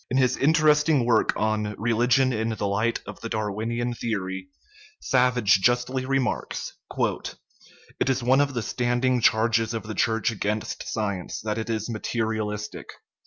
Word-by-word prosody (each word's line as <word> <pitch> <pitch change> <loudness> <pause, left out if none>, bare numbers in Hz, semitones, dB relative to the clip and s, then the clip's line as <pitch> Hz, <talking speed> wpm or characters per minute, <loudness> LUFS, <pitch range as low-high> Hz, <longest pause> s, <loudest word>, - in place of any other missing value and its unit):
In 130 - 0
his 130 -1 +3
interesting 150 -2 +3
work 115 -2 +3
on 105 -1 -1
Religion 120 +4 +2
in 110 0 -1
the 110 -2 -2
Light 105 +4 0
of - - -9
the 115 - -5
Darwinian 110 +3 -2
Theory, 95 -5 -3 0.5
Savage 125 -7 +3
justly 125 +3 +1
remarks: 135 -2 -1
" - - -11 1.0
It - - +1
is 130 -1 0
one 130 +3 +4
of 140 -2 -1
the 115 - -1
standing 125 +2 0
charges 115 +1 +2
of 115 - -3
the 110 0 -6
Church 110 +3 +1
against 105 0 -3
science 100 -4 -3
that 105 +1 -2
it 110 - -4
is 110 -1 -2
materialistic. 110 -2 -3
115 Hz, 150 wpm, -25 LUFS, 110-125 Hz, 1.0 s, one